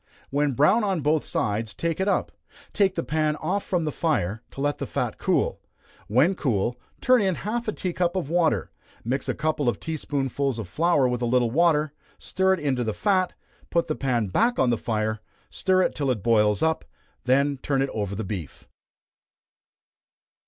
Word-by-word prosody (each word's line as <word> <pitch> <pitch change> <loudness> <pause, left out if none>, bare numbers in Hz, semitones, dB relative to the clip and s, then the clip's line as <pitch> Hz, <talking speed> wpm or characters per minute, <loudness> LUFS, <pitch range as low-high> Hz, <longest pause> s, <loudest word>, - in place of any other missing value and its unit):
When 145 0 +1
brown 150 - +4
on 190 -5 0
both 150 +2 +2
sides, 105 +1 -2
take 170 0 -2
it 190 - 0
up, 200 - +1 0.4
take 195 -3 +2
the 165 - -1
pan 155 -1 0
off 195 +5 -2
from 180 -3 -1
the 150 - -1
fire, 115 - -1
to - - -11
let 145 +1 0
the - - -3
fat - - -3
cool; - - +1 0.5
when 130 - +3
cool, 120 - 0 0.3
turn 255 -2 +5
in 190 -3 +1
half 230 +6 -3
a - - +1
tea 185 -4 -3
cup 175 +1 0
of 185 -7 -1
water, 160 - +1 0.3
mix 130 +3 -2
a - - 0
couple 155 -4 0
of - - -3
tea 160 -1 -4
spoonsful 140 -2 -1
of 110 -5 -5
flour 160 - +2
with 125 -1 -2
a 120 - +1
little 120 -1 +2
water, 155 0 +2 0.2
stir 190 0 +1
it - - -9
into 135 -5 0
the 110 -2 -2
fat, 185 - +1 0.4
put 170 -1 +1
the 155 - -2
pan 125 -5 0
back 235 - +2
on 125 -2 +3
the - - +3
fire, 110 -1 -1 0.3
stir 185 -1 +2
it - - 0
till 140 -3 -1
it 110 -7 -1
boils 105 +1 +3
up, 160 0 +1 0.4
then 140 +2 +2
turn 135 -2 +1
it 135 - -2
over 100 -2 -3
the 110 - -3
beef. 95 -7 -6
145 Hz, 195 wpm, -25 LUFS, 120-175 Hz, 0.5 s, turn